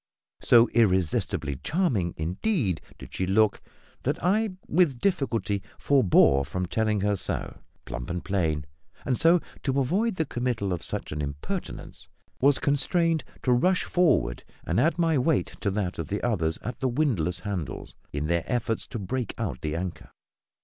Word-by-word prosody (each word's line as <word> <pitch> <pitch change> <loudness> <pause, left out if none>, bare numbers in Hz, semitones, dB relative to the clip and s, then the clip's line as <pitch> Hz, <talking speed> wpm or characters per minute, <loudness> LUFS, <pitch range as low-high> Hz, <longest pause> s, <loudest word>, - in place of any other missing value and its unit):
So 120 -1 +6
irresistibly 90 - +1
charming, 120 - 0
indeed, 95 - -1 0.2
did - - -12
she 95 - -1
look, 105 +2 +3 0.4
that - - 0
I 205 +2 +2
with 155 -6 +3
difficulty 115 - 0 0.2
forebore 90 - +4
from 90 +6 -3
telling 110 +2 0
her 105 +1 +2
so, - - -4 0.3
plump - - -6
and 85 0 -4
plain; 80 -7 0 0.4
and 130 - +1
so, 165 +6 +5 0.2
to 135 0 0
avoid 190 - +1
the 160 - 0
committal 120 -7 -1
of 85 - -3
such - - -4
an 75 0 -3
impertinence, 70 0 -6 0.3
was 140 +1 +5
constrained 160 +3 +1 0.2
to 125 - +2
rush 180 +10 +3
for'ard 170 - +2 0.2
and - - +1
add 160 +5 +2
my 165 -4 +2
weight 140 +2 +1
to 100 - +1
that 95 -3 -2
of 80 - -3
the 100 +5 -3
others 80 -9 0
at 120 - -5
the 130 - +1
windlass 110 - 0
handles 90 -9 -5 0.2
in 70 +1 -2
their 85 +1 +1
efforts 115 -2 -1
to 125 - -5
break 115 +5 -3
out 100 - -3
the 75 0 -2
anchor. 90 +1 -5
110 Hz, 160 wpm, -27 LUFS, 90-140 Hz, 0.4 s, So